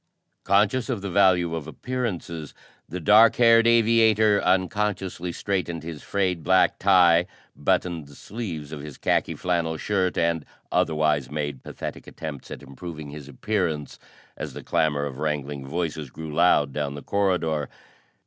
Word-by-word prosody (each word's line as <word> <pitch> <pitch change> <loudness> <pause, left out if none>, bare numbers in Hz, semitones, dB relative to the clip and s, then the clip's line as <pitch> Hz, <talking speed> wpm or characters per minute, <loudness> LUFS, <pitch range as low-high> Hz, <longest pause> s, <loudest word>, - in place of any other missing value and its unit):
Conscious 105 +6 +2
of 120 -6 -2
the 100 - -4
value 90 -3 +3
of 80 -2 -4
appearances, 90 - -4 0.3
the 90 - -4
dark 105 +5 +6
haired 115 -1 +5
aviator 110 -2 +4
unconsciously 95 -1 0
straightened 85 -3 -3
his 80 -2 -7
frayed 90 -4 -1
black 95 +2 +3
tie, 90 -2 +5 0.3
buttoned 85 -5 -1
the 70 - -15
sleeves 85 -10 -6
of 80 - -6
his 75 -1 -9
khaki - - 0
flannel 85 -3 -1
shirt 95 0 -1
and 85 -2 +1 0.3
otherwise 75 -4 +1
made 75 -2 -4
pathetic - - -7
attempts 75 -4 -8
at - - -8
improving 75 +2 -8
his 75 -1 -9
appearance 80 -2 -2 0.4
as - - -6
the - - -8
clamor 75 -2 +1
of 70 -1 -6
wrangling 75 -2 -3
voices 80 -2 -3
grew 80 +3 -8
loud 75 -4 +3
down 70 -1 -3
the 70 - -8
corridor. 90 -7 0
85 Hz, 145 wpm, -25 LUFS, 75-100 Hz, 0.4 s, dark